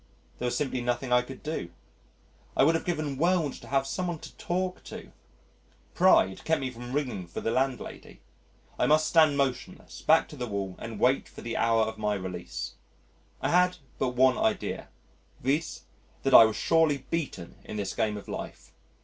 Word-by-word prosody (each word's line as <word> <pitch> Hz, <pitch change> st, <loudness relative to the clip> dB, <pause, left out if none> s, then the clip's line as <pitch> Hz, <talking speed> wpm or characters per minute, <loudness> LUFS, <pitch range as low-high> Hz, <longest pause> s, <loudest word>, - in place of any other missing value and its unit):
There 125 Hz, -, -1 dB
was 120 Hz, -, -1 dB
simply 130 Hz, -3 st, -1 dB
nothing 125 Hz, +1 st, -1 dB
I 125 Hz, -, +6 dB
could 130 Hz, +2 st, -10 dB
do. 150 Hz, -, -3 dB, 0.9 s
I -, -, +6 dB
would 160 Hz, +4 st, +5 dB
have 165 Hz, -, -1 dB
given 155 Hz, -6 st, -2 dB
worlds 170 Hz, -3 st, +1 dB
to -, -, -13 dB
have 135 Hz, 0 st, +1 dB
some 180 Hz, +7 st, -2 dB
one 175 Hz, -2 st, -2 dB
to -, -, -12 dB
talk 180 Hz, +1 st, -2 dB
to. -, -, -9 dB, 0.8 s
Pride 95 Hz, 0 st, +4 dB
kept 160 Hz, 0 st, +1 dB
me 130 Hz, -1 st, -3 dB
from 120 Hz, 0 st, -9 dB
ringing 125 Hz, -10 st, -2 dB
for 85 Hz, -, -6 dB
the 115 Hz, -, -1 dB
landlady. 130 Hz, 0 st, -3 dB, 0.6 s
I -, -, +3 dB
must 155 Hz, +1 st, +4 dB
stand 155 Hz, -2 st, +4 dB
motionless, 130 Hz, -2 st, -3 dB
back 160 Hz, +1 st, +4 dB
to -, -, -10 dB
the 125 Hz, -3 st, -4 dB
wall, 100 Hz, -3 st, -3 dB
and 115 Hz, -2 st, -7 dB
wait 130 Hz, +4 st, +2 dB
for -, -, -11 dB
the 115 Hz, -, -4 dB
hour 115 Hz, -1 st, +3 dB
of 110 Hz, 0 st, -4 dB
my 105 Hz, -1 st, 0 dB
release. 90 Hz, -9 st, -5 dB, 0.7 s
I -, -, +1 dB
had 180 Hz, +1 st, +4 dB, 0.2 s
but 125 Hz, -1 st, 0 dB
one 130 Hz, 0 st, +4 dB
idea, 110 Hz, -, -1 dB, 0.5 s
viz., 150 Hz, +5 st, -1 dB, 0.4 s
that -, -, +1 dB
I 115 Hz, -, +11 dB
was 110 Hz, -1 st, -1 dB
surely 155 Hz, -3 st, +2 dB
beaten 140 Hz, -, -3 dB
in 105 Hz, -, -7 dB
this 100 Hz, -2 st, -2 dB
game 110 Hz, -2 st, 0 dB
of 100 Hz, -, -10 dB
life. -, -, -7 dB
130 Hz, 185 wpm, -28 LUFS, 110-155 Hz, 0.9 s, I